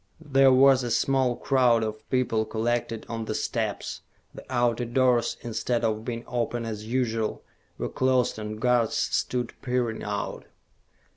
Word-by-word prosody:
There 135 0 +7
was 135 0 +6
a 120 - -3
small 130 +1 +2
crowd 125 -4 +3
of 110 0 -5
people 125 -4 +1
collected 115 +1 -2
on 115 -1 -4
the - - -3
steps. - - -3 0.3
The - - -10
outer 120 -1 +1
doors, 120 -1 +2
instead 115 +1 -2
of 110 -1 0
being 115 -1 -4
open 120 -1 -2
as 110 -1 -5
usual, 115 -3 -1 0.3
were - - -2
closed 130 -3 +1
and 105 0 -5
guards 120 -1 +2
stood 125 -2 -1
peering 125 -3 -1
out. 105 0 -4
120 Hz, 145 wpm, -26 LUFS, 110-125 Hz, 0.3 s, There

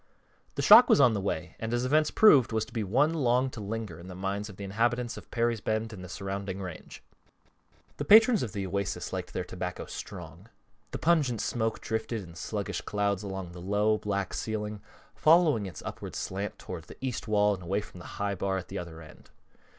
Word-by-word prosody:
The - - -2
shock 250 - +9
was - - +6
on 125 -5 +6
the 100 - -1
way, 95 -5 -3
and 110 0 -3
as 120 +1 0
events 155 +3 +3
proved, 145 - +6
was 110 -1 0
to - - -16
be 115 -3 -1
one 135 - +2
long 130 -3 +2
to 110 - -8
linger 105 -5 -5
in 85 - -11
the 90 - -8
minds 100 +3 -3
of 100 - -12
the 100 - -7
inhabitants 120 +4 0
of - - -11
Perry's 115 -2 0
Bend 110 +1 -2
and 95 -3 -9
the 90 - -9
surrounding 95 0 -4
range. 90 -3 -8 0.9
The 145 - -3
patrons 220 - +7
of 115 - -3
the 100 0 -3
Oasis 100 +1 -3
liked - - -4
their - - -3
tobacco - - -5
strong. 90 +1 -9 0.4
The - - -4
pungent 150 -9 +2
smoke 115 0 -1
drifted 110 -1 -3
in 85 -2 -12
sluggish 80 - -4
clouds 100 -2 -1
along 95 -3 -5
the 90 0 -10
low, 105 +3 +1
black 100 -1 -2
ceiling, 105 -1 -3 0.3
following 155 - +4
its 85 -5 -9
upward - - -7
slant 100 +2 -4
toward 85 -4 -8
the - - -13
east 130 -4 -4
wall 105 -1 +3
and 95 - -6
away 95 +4 -1
from 90 - -12
the 90 - -10
high 100 0 -1
bar 95 0 -1
at 95 - -7
the - - -4
other 85 -2 -8
end. 75 - -16
105 Hz, 210 wpm, -29 LUFS, 95-120 Hz, 0.9 s, shock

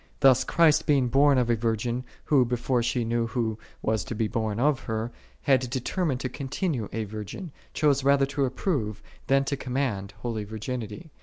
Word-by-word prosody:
Thus 130 -2 +6
Christ 160 +1 +3
by 150 - +5
being 130 -3 +2
born 140 +2 +5
of 120 -2 +2
a - - +4
virgin, 115 +2 -1 0.2
who, 140 -4 +5
before 125 +1 0
she 120 0 0
knew 115 0 0
Who 110 -2 -2 0.2
was 110 -1 +1
to 115 - -5
be 110 0 0
born 110 -1 -2
of 140 +1 +3
her, 110 +1 -2 0.3
had 130 -3 +3
determined 130 +2 -1
to - - -1
continue 135 - -3
a 110 0 -2
virgin, 110 - -7 0.2
chose 140 -3 +3
rather 140 0 +4
to 140 0 0
approve, 125 - -2 0.2
than 135 0 +4
to 140 - -1
command, 125 -7 -2
holy 115 -3 -2
virginity. 110 - -6
125 Hz, 180 wpm, -27 LUFS, 110-140 Hz, 0.3 s, Thus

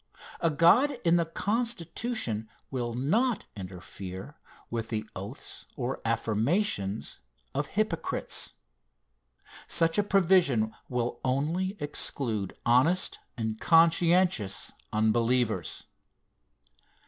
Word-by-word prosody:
A 165 - +2
God 215 - +5
in 170 +1 +5
the 170 -1 +1
Constitution 205 - -2 0.2
will 120 -3 -2
not 215 - +1
interfere 95 +4 -8 0.4
with 115 -1 -3
the 110 -1 -2
oaths 100 +9 -7
or 130 +1 -3
affirmations 115 - 0 0.3
of 145 +1 -1
hypocrites. 200 -6 -1 1.1
Such 165 +2 +2
a - - +4
provision 175 - +3 0.2
will 125 -1 -1
only 165 +10 0
exclude 120 - -1
honest 135 +10 +3 0.2
and 110 -1 -2
conscientious 165 - +3 0.2
unbelievers. 110 -3 +1
135 Hz, 90 wpm, -29 LUFS, 110-175 Hz, 1.1 s, God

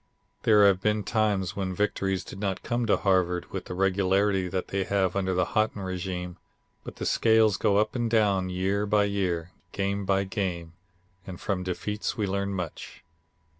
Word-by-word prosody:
There 105 -2 +5
have 95 -2 +4
been 105 0 +1
times 105 -4 0
when 95 -2 -3
victories 95 -2 -1
did 95 - -10
not 100 -2 -2
come 120 0 -1
to 105 - +4
Harvard 90 -2 +1
with - - -5
the 90 - -6
regularity 95 0 +2
that 90 +1 -3
they 95 0 0
have 95 -2 0
under 95 -2 0
the 90 0 +2
Haughton 110 -2 +1
régime, 90 -1 -4 0.5
but - - -9
the - - -5
scales 110 -2 +4
go 100 -2 +2
up 105 +1 +1
and 120 -2 0
down 100 -5 +2
year 95 +3 -1
by 105 0 +3
year, 90 -4 -1 0.2
game 100 0 -1
by 95 0 +2
game, 95 -5 -3 0.5
and 90 -2 -7
from 95 -3 -2
defeats 105 +3 -3
we 105 - 0
learn 100 0 -2
much. 90 -4 -6
95 Hz, 175 wpm, -27 LUFS, 95-105 Hz, 0.5 s, There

